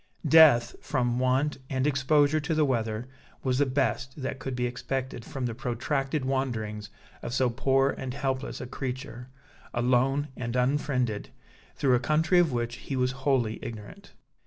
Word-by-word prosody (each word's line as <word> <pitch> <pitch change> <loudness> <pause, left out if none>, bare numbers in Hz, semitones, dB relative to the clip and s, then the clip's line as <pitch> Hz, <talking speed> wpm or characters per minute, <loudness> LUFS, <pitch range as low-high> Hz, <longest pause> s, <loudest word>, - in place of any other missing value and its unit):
Death, 145 -7 +7
from 125 -3 0
want 130 +3 +1
and 130 -1 0
exposure 145 +2 +3
to 155 +2 -2
the 155 -1 +3
weather, 115 -3 -1 0.4
was 130 0 +1
the 145 - +3
best 135 0 -1
that 130 0 -4
could 130 -1 -4
be 125 0 -1
expected 125 0 -4
from 130 +1 -5
the 120 - -2
protracted 135 +3 -2
wanderings 115 -6 -2 0.3
of 120 - -4
so 130 -3 +2
poor 135 +2 +2
and 130 0 -5
helpless 135 -1 -2
a - - -5
creature, 130 -1 -6 0.5
alone 130 +4 +2
and 120 -1 -4
unfriended, 125 -4 0 0.5
through 135 -2 +2
a 125 - +4
country 155 +7 +3
of 170 -4 +3
which 120 0 -2
he 135 - -5
was 125 0 +1
wholly 130 -4 0
ignorant. 115 - -9
130 Hz, 160 wpm, -28 LUFS, 120-140 Hz, 0.5 s, Death